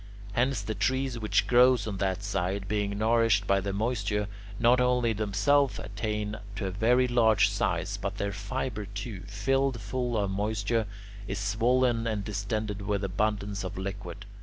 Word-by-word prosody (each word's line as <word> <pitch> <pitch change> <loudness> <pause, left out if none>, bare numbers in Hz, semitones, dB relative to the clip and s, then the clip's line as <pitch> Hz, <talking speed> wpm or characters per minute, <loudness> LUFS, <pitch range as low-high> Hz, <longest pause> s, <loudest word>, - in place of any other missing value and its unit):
Hence 130 +5 +1
the 110 - -3
trees 130 0 0
which 110 -1 +1
grow 125 +1 +6
on 105 -3 -4
that 95 0 -1
side, 95 0 -2
being 100 -1 -1
nourished 110 -1 +3
by 95 0 +2
the 100 +1 -2
moisture, 105 -1 -1 0.3
not 120 +2 +5
only 125 -2 +2
themselves 110 +7 +2
attain 105 -1 -3 0.2
to 95 - -3
a 95 - -2
very 120 +6 +3
large 110 -4 +4
size, 95 -1 -1
but 100 0 -4
their 100 0 -2
fibre 105 +1 -4
too, 100 0 -6
filled 130 +6 0
full 120 +3 -2
of 100 -2 0
moisture, 105 +2 0 0.4
is 100 - -3
swollen 115 +3 +2
and 105 -3 -1
distended 105 +1 -3
with 100 0 -1
abundance 100 +1 -1
of 95 0 -5
liquid. 100 0 -6
105 Hz, 160 wpm, -28 LUFS, 100-120 Hz, 0.4 s, grow